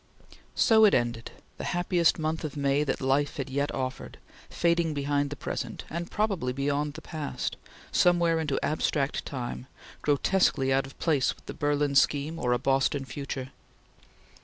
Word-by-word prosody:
So 220 -1 +5
it 205 - +5
ended; 120 -1 -1 0.3
the - - -4
happiest 175 -1 +2
month 160 +1 -2
of 155 -1 -5
May 140 +1 +2
that 140 -1 -2
life 135 +2 +1
had 135 -1 -4
yet 140 +2 0
offered, 130 0 -4 0.3
fading 170 -2 +1
behind 145 0 0
the 145 - -5
present, - - -5
and 170 +2 -4
probably 195 -12 -1
beyond 145 +2 -1
the 160 - -9
past, 145 -5 -4 0.4
somewhere 170 -2 +3
into 150 -4 -1
abstract 150 -2 -1
time, 125 -1 -5 0.3
grotesquely 145 -2 +2
out 135 0 +1
of 135 - -15
place 150 -6 +1
with - - -24
the - - -6
Berlin 145 -1 0
scheme 145 +3 +2
or 125 - 0
a 125 - +3
Boston 135 +2 +1
future. 130 0 -5
145 Hz, 160 wpm, -28 LUFS, 135-160 Hz, 0.4 s, So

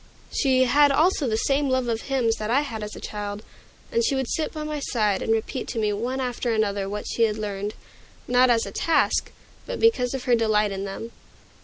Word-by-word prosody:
She 260 -3 +3
had 285 +3 +5
also 310 0 +2
the 220 -2 0
same 275 +4 +1
love 260 -1 +1
of 225 -1 -1
hymns 245 -5 0
that 215 0 -4
I 265 +5 +3
had 230 -7 -5
as 210 0 -6
a - - -8
child, 205 0 -5 0.5
and 465 0 +1
she 285 - +1
would 265 -2 -1
sit 315 +4 -1
by 310 -1 -5
my 305 -1 -3
side 215 -7 0
and - - -1
repeat 225 +3 -1
to - - -5
me 210 -2 +1
one 245 +6 -2
after 245 -1 -2
another 200 -3 0
that 210 +1 -4
she - - -3
had 215 -1 -1
learned, 205 -1 -4 0.5
not 250 +1 +4
as 230 -2 +3
a 200 - -7
task, 320 +7 +1 0.4
but - - -4
because 270 - +3
of 260 - -5
her 250 - +2
delight 215 -3 +2
in 195 0 -4
them. 200 +4 -6
235 Hz, 220 wpm, -24 LUFS, 210-270 Hz, 0.5 s, had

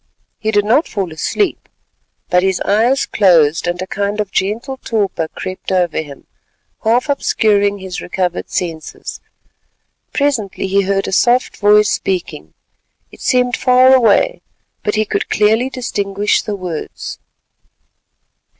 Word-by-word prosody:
He 220 - -2
did 205 -1 +2
not 255 +9 +3
fall 190 -6 -3
asleep, 360 - -2 0.6
but 180 - +4
his 190 0 0
eyes 235 +7 +2
closed, 170 -5 +3
and 175 +1 -2
a - - -5
kind 200 +2 -3
of 205 -2 -2
gentle 225 +9 -2
torpor 205 -9 -1
crept 185 +3 -7
over 180 -3 +1
him, 145 -3 -11 0.6
half 240 +6 +2
obscuring 205 -7 +1
his 190 -2 -6
recovered 180 -1 -3
senses. 165 -3 -5 0.9
Presently 245 -11 -1
he 195 +1 +2
heard 195 0 0
a - - -3
soft 240 +6 +2
voice 210 0 +4
speaking; 170 - -3 0.6
it - - -15
seemed 250 -1 +2
far 255 +1 +5
away, 260 - +3 0.4
but 210 - -1
he 215 0 +1
could - - -2
clearly 220 +5 +2
distinguish 205 -5 -1
the 210 - -4
words. 180 -5 -6
205 Hz, 130 wpm, -16 LUFS, 185-235 Hz, 0.9 s, far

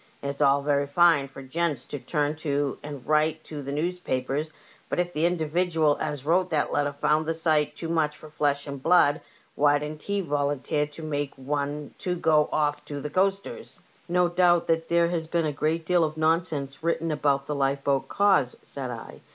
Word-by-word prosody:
It's 140 +1 -4
all 140 0 +4
very 140 -1 +1
.fine 155 -2 +4
for 135 0 -11
gents 145 -1 -2
to 145 - -6
turn 150 0 -1
to 145 -3 -1
and 145 -3 -8
write 155 +1 +1
to 150 -2 -7
the 140 0 -5
newspapers; 150 -3 -2 0.4
but - - -1
if 175 0 -1
the 155 +3 +2
individual 165 -2 +1
as 145 -2 -3
wrote 180 +3 +2
that 150 -3 0
letter 145 0 +1
found 150 +2 +1
the 165 - 0
sight 155 -2 +1
too 165 - -5
much 155 -2 0
for 155 - -12
flesh 145 -2 -1
and 140 -2 -6
blood, 160 -1 +4 0.3
why 145 0 +4
didn't 150 +1 -6
he 200 +3 -1
volunteer 145 -1 -1
to 150 +2 -11
make 145 -2 -3
one 145 +2 -3
to 180 -3 -2
go 155 -3 +3
off 150 -1 0
to 145 -1 -5
the 150 +1 -5
coasters? 195 +3 -1
*' - - -32
'' - - -32
No 180 0 +4
doubt 175 -1 +3 0.2
there 170 0 +3
has 165 -2 -2
been 170 0 0
a 150 - 0
great 160 +3 -1
deal 175 -1 +3
of 155 0 -2
nonsense 155 -3 0
written 165 0 0
about 140 -2 +1
the 150 - -3
lifeboat 140 0 0
cause," 195 -11 +2
said 135 -3 -4
I. 115 -2 -8
150 Hz, 195 wpm, -26 LUFS, 145-165 Hz, 0.4 s, all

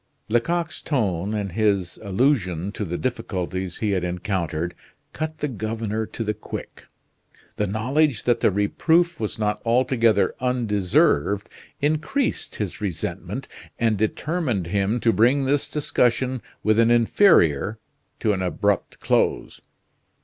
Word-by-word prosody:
Lecoq's 165 +9 0
tone, 105 - -1
and 100 -3 -2
his 100 -3 0
allusion 100 - +1
to 105 - -4
the 90 -2 -3
difficulties 95 -7 -3
he 105 -2 -1
had 95 -2 0
encountered, 90 -2 -2 0.4
cut 155 0 -4
the 150 - -2
governor 110 -2 -3
to 115 - -5
the 105 -1 -1
quick. 105 - -8 0.7
The 105 - 0
knowledge 125 +5 +1
that 120 -1 +2
the - - +4
reproof 160 - +2
was 110 - -3
not 105 -1 -1
altogether 115 -3 +3
undeserved 105 - +1 0.3
increased 155 - -1
his 105 -2 -4
resentment 95 -6 -4 0.3
and 115 -2 +2
determined 115 - -1
him 100 +6 0
to 115 - +3
bring 130 +5 +3
this 140 +1 +1
discussion 130 -3 0 0.2
with 110 +1 +3
an 115 0 +5
inferior 115 - +4 0.4
to 105 - +2
an 95 - -2
abrupt 100 +2 -1
close. - - 0
110 Hz, 125 wpm, -23 LUFS, 100-130 Hz, 0.7 s, an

